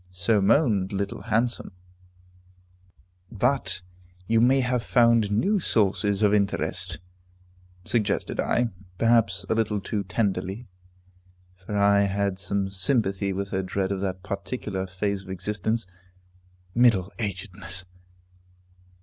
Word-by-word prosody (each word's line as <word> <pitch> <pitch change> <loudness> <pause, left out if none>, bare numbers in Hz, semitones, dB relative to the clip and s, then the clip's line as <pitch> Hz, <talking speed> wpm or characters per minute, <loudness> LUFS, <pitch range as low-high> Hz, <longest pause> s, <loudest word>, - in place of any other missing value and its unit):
So 90 +4 +1
moaned 100 -3 +3
Little 100 0 -3
Handsome. 115 -1 0 1.6
"But 110 -5 0 0.4
you 115 +3 +3
may 130 +3 +4
have 125 -1 0
found 115 -3 +3
new 190 - +2
sources 105 - +1
of 105 0 +4
interest," 95 -3 -1 0.9
suggested 105 -4 -1
I, 120 -1 +1 0.3
perhaps 115 -5 +2
a - - +1
little 110 -2 0
too 100 +1 -3
tenderly, 100 +2 -2 0.9
for 95 +3 -5
I 100 0 +4
had 100 -1 -1
some 100 0 -1
sympathy 100 -1 +1
with 100 +1 -3
her 95 -1 -1
dread 95 +1 -2
of 95 -1 -2
that 95 -1 -3
particular 100 -1 -4
phase 100 +2 -2
of 95 - -14
existence, 105 +4 -2 0.9
middle 110 -6 +3
agedness. 95 -3 -1
100 Hz, 115 wpm, -25 LUFS, 95-115 Hz, 1.6 s, may